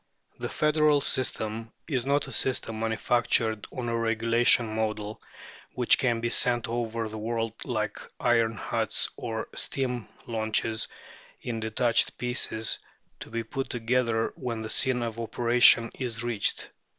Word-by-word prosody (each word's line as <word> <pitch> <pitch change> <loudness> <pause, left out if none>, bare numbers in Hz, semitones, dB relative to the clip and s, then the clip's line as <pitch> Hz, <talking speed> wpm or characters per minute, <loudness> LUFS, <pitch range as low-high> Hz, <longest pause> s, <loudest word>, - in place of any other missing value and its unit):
The - - -3
federal 150 -1 +3
system 115 -4 -1 0.2
is 130 -5 -1
not 140 +1 +2
a - - -8
system 115 -4 0
manufactured 110 0 +1
on 125 -2 -4
a 115 - -1
regulation 115 0 +2
model, 110 -1 -3 0.5
which 125 -2 +5
can 120 -3 +1
be 120 0 -1
sent 120 -1 +3
over 115 -1 -2
the 110 0 -7
world 115 0 -2
like 110 -4 -2 0.2
iron 115 -2 +2
huts 105 - 0
or 110 -1 -4
steam 125 -5 0 0.2
launches, 110 0 0 0.6
in 115 -2 -3
detached 115 +1 +1
pieces, 125 -2 0 0.4
to - - -9
be 115 0 -3
put 135 +4 -4
together 115 -1 0
when 120 -3 -4
the 110 - -5
scene 125 -2 +2
of 115 -1 -4
operation 120 0 +5
is 120 -3 -4
reached. 120 -4 -1
115 Hz, 140 wpm, -27 LUFS, 110-125 Hz, 0.6 s, which